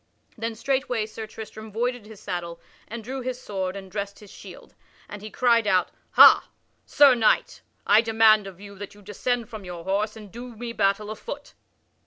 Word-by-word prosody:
Then 230 0 -4
straightway 250 -2 -1
Sir 220 0 -8
Tristram 220 0 -10
voided 240 0 -2
his 215 -2 -12
saddle 175 -3 -5 0.3
and 230 0 -7
drew 260 +3 -5
his 250 0 -4
sword 190 -5 -4
and 190 -1 -9
dressed 200 0 -4
his 205 -2 -15
shield. - - -13 0.3
And 205 - -9
he 215 - -7
cried 235 -2 +2
out: 185 -2 +2 0.2
"Ha, - - +8 0.4
Sir 285 -3 +6
Knight! 230 -3 +1 0.2
I 215 - +6
demand 220 -2 +4
of 190 -2 -11
you 200 0 -11
that 205 0 -8
you 205 - -17
descend 230 +4 -2
from 220 -3 -9
your 175 -2 -8
horse 205 +4 -1
and 210 -3 -12
do 240 +2 -9
me 235 +1 -6
battle 205 0 0
afoot." 285 +6 -8
215 Hz, 185 wpm, -25 LUFS, 200-235 Hz, 0.4 s, Ha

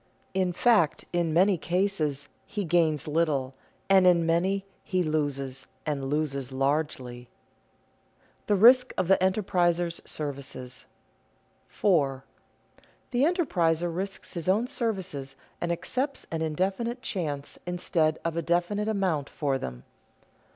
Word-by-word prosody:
In 185 -1 +1
fact 195 -4 +3
in 170 -2 +1
many 185 +2 +4
cases 170 -6 0 0.2
he 210 - -3
gains 160 -3 +2
little, 150 -4 0 0.3
and 190 -1 +6
in 170 -2 +5
many 185 +4 +1 0.2
he 185 -2 0
loses 140 -4 -2 0.2
and 145 -3 -2
loses 140 -3 -1
largely. 135 -3 -2
[Sidenote: - - -38
The 205 - +3
risk 250 +5 +6
of 185 - +1
the 195 - +5
enterpriser's 175 -3 +1
services] 135 -4 -5 0.8
4. 140 -10 +1 0.9
_The 265 +7 +3
enterpriser 175 - +1
risks 195 +2 -5
his 170 0 -3
own 210 +5 +3
services 190 - -3 0.3
and 175 - 0
accepts 260 - -2
an 165 -1 -2
indefinite 195 - -1
chance 145 - -4
instead 165 -3 +1
of 165 -1 -1
a 170 - 0
definite 175 +6 0
amount 185 -9 0
for 140 -3 -1
them. 60 - -6
170 Hz, 125 wpm, -27 LUFS, 145-190 Hz, 0.9 s, and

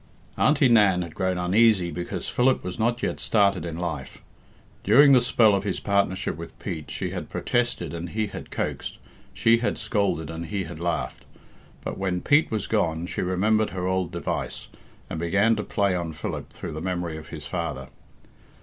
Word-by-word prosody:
Auntie 150 -3 +4
Nan 100 -6 +5
had 85 -2 -9
grown 95 -1 -1
uneasy 95 0 +3
because 85 +3 -4
Philip 130 +1 +2
was 90 +3 -5
not 120 +2 0
yet - - -1
started 100 -5 +2
in 85 -1 -5
life. 80 -7 -4 0.6
During 140 +8 +7
the 130 -2 +7
spell 115 -3 +4
of 100 0 +1
his 100 -2 -2
partnership 100 -3 0
with 85 0 -9
Pete 80 -7 -6
she - - -3
had - - -5
protested 120 -10 -1
and 85 +1 -5
he 110 +2 -1
had 100 - -8
coaxed, - - -3 0.3
she 115 0 +3
had 115 - -1
scolded 95 -7 -1
and 80 +1 -6
he 95 +3 -2
had 85 -1 -8
laughed. 85 -1 -3 0.6
But - - -5
when 90 -2 -1
Pete 145 +2 +4
was 110 -2 -2
gone 85 -6 0
she - - -3
remembered 105 +4 +2
her 90 -1 -4
old 95 -2 0
device, - - -4 0.4
and 80 - -5
began 100 +7 +3
to 105 - -2
play 100 -2 +1
on 85 -2 -3
Philip - - -5
through - - -7
the 80 - -5
memory 90 -2 -2
of 80 -1 -9
his - - -8
father. - - -4
95 Hz, 185 wpm, -25 LUFS, 85-110 Hz, 0.6 s, During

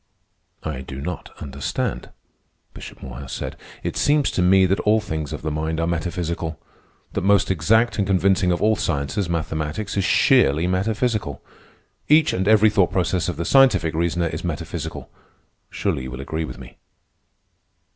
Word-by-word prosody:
"I 75 -4 -4
do 65 0 -8
not 85 +5 -5
understand," 70 -3 -3 0.6
Bishop - - -11
Morehouse 65 +1 -8
said. - - -5 0.3
"It - - -3
seems 145 -1 +2
to - - 0
me 95 +1 +5
that 95 +2 +1
all 110 +1 +3
things 80 -7 -4
of - - -6
the 80 - -2
mind 80 +2 -2
are 80 - +1
metaphysical. 85 -2 -3 0.5
That - - -1
most 100 +1 +3
exact 110 +8 +2
and 100 - +1
convincing 95 -1 +2
of 85 - -1
all 110 +1 +4
sciences, 85 -1 -2
mathematics, 80 +4 -3
is 100 - +2
sheerly 75 0 +4
metaphysical. 100 - -1 0.7
Each 155 +1 +5
and 95 +1 -1
every 110 0 +5
thought 95 -4 +2
process 90 -1 0
of 85 - -4
the 85 - -3
scientific 95 - +4
reasoner 85 +1 0
is 80 -1 -4
metaphysical. 85 -1 -5 0.6
Surely - - -2
you 65 - -6
will 65 +1 -7
agree 80 +3 -3
with - - -8
me?" 65 -1 -13
85 Hz, 160 wpm, -22 LUFS, 80-100 Hz, 0.7 s, me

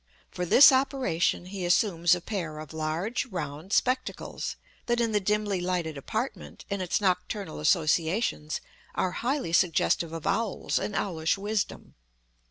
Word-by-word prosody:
For 180 0 -3
this 270 - +9
operation 260 - +1
he 190 0 -6
assumes 175 -1 +3
a 180 - -6
pair 170 -7 -4
of 155 0 -8
large, 160 +11 -2
round 165 - -6
spectacles, 255 +4 -1 0.3
that 240 0 +1
in 230 -1 +1
the 210 - +2
dimly 205 -1 0
lighted 175 -3 -1
apartment 220 - -5
and 200 -1 -1
its 180 - 0
nocturnal 195 -2 -1
associations 160 +1 +1 0.3
are 185 - 0
highly 250 - -2
suggestive 170 -1 +2
of 165 -2 -6
owls 225 -4 0
and 210 - -4
owlish 165 -2 0
wisdom. 205 +1 -3
185 Hz, 140 wpm, -28 LUFS, 165-215 Hz, 0.3 s, this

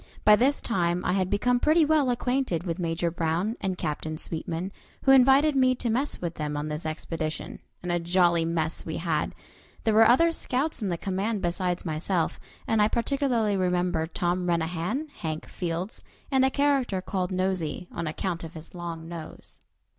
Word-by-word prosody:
By 210 - +9
this 265 +6 +2
time 175 -5 0
I 180 - +2
had 185 -1 +1
become 245 +5 +2
pretty 310 +4 +4
well 295 -3 +3
acquainted 245 -7 0
with 175 -1 -3
Major 170 0 -1
Brown 170 +6 -1
and 190 -2 -1
Captain 155 0 -3
Sweetman, 170 +3 -4 0.3
who 270 - +5
invited 270 +3 +6
me 255 -1 +4
to 240 -2 -1
mess 265 +6 -1
with 170 -2 -3
them 150 -2 -3
on 150 +1 -3
this 150 +1 -3
expedition, 155 0 -4 0.2
and 180 - -2
a 175 - +2
jolly 170 -1 +3
mess 165 -1 -1
we 160 - -4
had. 165 -2 -1 0.5
There 220 - +2
were 220 +1 +7
other 335 +8 +5
scouts 285 -2 -1
in 205 - -1
the 170 - -1
command 195 +3 -2
besides 175 +1 -1
myself, 165 +2 -1 0.3
and 220 -1 +2
I 210 - +5
particularly 235 -3 +1
remember 180 -3 +1
Tom 180 +1 -1
Renahan, 175 - -1
Hank 155 -2 -4
Fields, 175 +3 -4 0.3
and 265 -1 +4
a 265 - +4
character 275 -8 +1
called 185 0 -2
"Nosey," 185 -2 -1
on 165 - -4
account 170 +2 -3
of 165 0 -8
his 160 0 -10
long 170 -2 -6
nose. 165 -2 -9
180 Hz, 175 wpm, -27 LUFS, 165-235 Hz, 0.5 s, By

